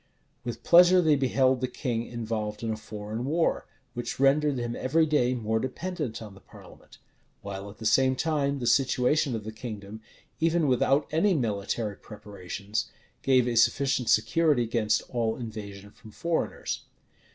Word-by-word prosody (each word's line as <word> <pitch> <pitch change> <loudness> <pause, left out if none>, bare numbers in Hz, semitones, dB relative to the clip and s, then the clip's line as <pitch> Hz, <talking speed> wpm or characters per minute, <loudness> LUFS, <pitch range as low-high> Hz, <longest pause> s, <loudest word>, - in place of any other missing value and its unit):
With 120 -1 -6
pleasure 180 +1 +7
they 160 -4 +4
beheld 130 -1 +2
the 130 - 0
king 120 -2 -3
involved 110 -2 -4
in 115 - -1
a - - -1
foreign 105 +1 -6
war, 160 +5 0 0.3
which 120 +1 -5
rendered 140 +1 +3
him 120 -1 -3
every 160 +6 +2
day 130 -5 +1
more 110 -1 -1
dependent 135 -3 -4
on 105 -2 -10
the 95 - -15
parliament; - - -16 0.5
while 100 0 -6
at 100 - -13
the 110 - -9
same 130 +4 +3
time 145 -1 0
the 125 - -4
situation 130 +2 +2
of 110 - -5
the 110 - -6
kingdom, 110 -2 -8 0.4
even 165 0 +2
without 135 +3 +2
any 175 +5 +2
military 105 -3 -2
preparations, 100 0 -6 0.3
gave 130 -2 +3
it 120 -1 -1
sufficient 130 0 +2
security 140 +4 +3
against 110 -2 0
all 115 -2 0
invasion 105 -4 -8
from 110 - -16
foreigners. 165 +9 -2
120 Hz, 155 wpm, -27 LUFS, 110-140 Hz, 0.5 s, pleasure